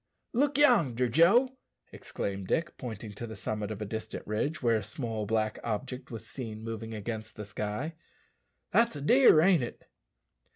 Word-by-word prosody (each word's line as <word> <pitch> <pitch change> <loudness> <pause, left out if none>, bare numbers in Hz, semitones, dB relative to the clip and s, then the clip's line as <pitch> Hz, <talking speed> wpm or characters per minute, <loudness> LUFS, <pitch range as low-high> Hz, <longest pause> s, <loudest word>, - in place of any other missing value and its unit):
"Look 280 +3 +2
yonder, 160 - +4
Joe," 220 - +4 0.3
exclaimed 100 -1 -5
Dick, 170 - 0
pointing 110 -4 -7
to 120 +3 -6
the 110 - -7
summit 105 -2 -3
of 105 -1 -4
a - - -4
distant 110 +2 -5
ridge, 125 +10 -1
where 115 -2 +4
a - - -2
small 110 0 -4
black 110 0 0
object 125 +4 -4
was 115 -2 -7
seen 110 -4 -7
moving 115 0 -5
against 110 0 -5
the 105 - -6
sky, 105 +9 -4 0.8
"that's 230 -6 +3
a 145 - -6
deer, 245 - +6
ain't 180 -3 +5
it?" 120 - -6
115 Hz, 165 wpm, -30 LUFS, 110-155 Hz, 0.8 s, deer